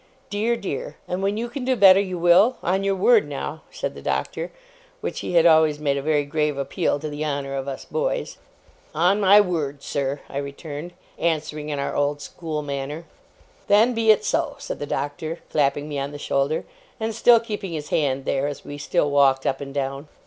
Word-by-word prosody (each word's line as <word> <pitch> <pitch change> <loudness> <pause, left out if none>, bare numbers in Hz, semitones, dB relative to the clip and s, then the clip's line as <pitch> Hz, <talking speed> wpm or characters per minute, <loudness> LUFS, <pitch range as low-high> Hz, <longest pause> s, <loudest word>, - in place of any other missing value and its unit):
Dear, 220 +3 +1
dear! 215 -4 -5
And 180 +1 -2
when 200 +2 0
you 235 +2 -2
can 250 +2 -6
do 260 0 +1
better, 195 -3 +7
you 185 -2 -2
will? 175 +8 +5
On 190 +3 +1
your 195 0 +1
word, 465 - +4
now?' - - -5
said - - -4
the - - -10
Doctor, - - -2 0.5
which - - -4
he - - -4
had 165 -1 +6
always 160 -2 +5
made 145 -2 0
a 140 - -2
very 150 0 +1
grave 150 -1 -1
appeal 140 +1 0
to 150 +2 -5
the 150 0 -4
honour 140 -2 -2
of 135 0 -3
us 135 -1 -5
boys. - - -2 0.6
'On 180 +6 +3
my 200 +1 +7
word, 155 -8 -1
sir!' 140 0 -2
I 135 - -6
returned, 145 +4 -7 0.3
answering 155 -2 -1
in 145 - -2
our 140 - -2
old 145 0 0
school 155 0 -5
manner. 145 +3 -5 0.6
'Then 220 +5 +5
be 225 -1 +1
it 215 0 +5
so,' 305 +3 0
said - - -6
the 145 - -4
Doctor, 145 +4 -3
clapping 145 0 +1
me 145 -2 -3
on 140 +1 -3
the 145 - -7
shoulder, 140 +1 -1 0.3
and 220 0 -2
still 235 +1 +6
keeping 210 -5 -5
his 150 -2 -5
hand 135 -3 0
there, 140 +1 0
as 145 -1 -6
we 145 0 -7
still 145 0 0
walked 135 -2 +4
up 135 0 0
and 140 -1 -6
down. 135 +1 -3
155 Hz, 205 wpm, -23 LUFS, 140-200 Hz, 0.6 s, better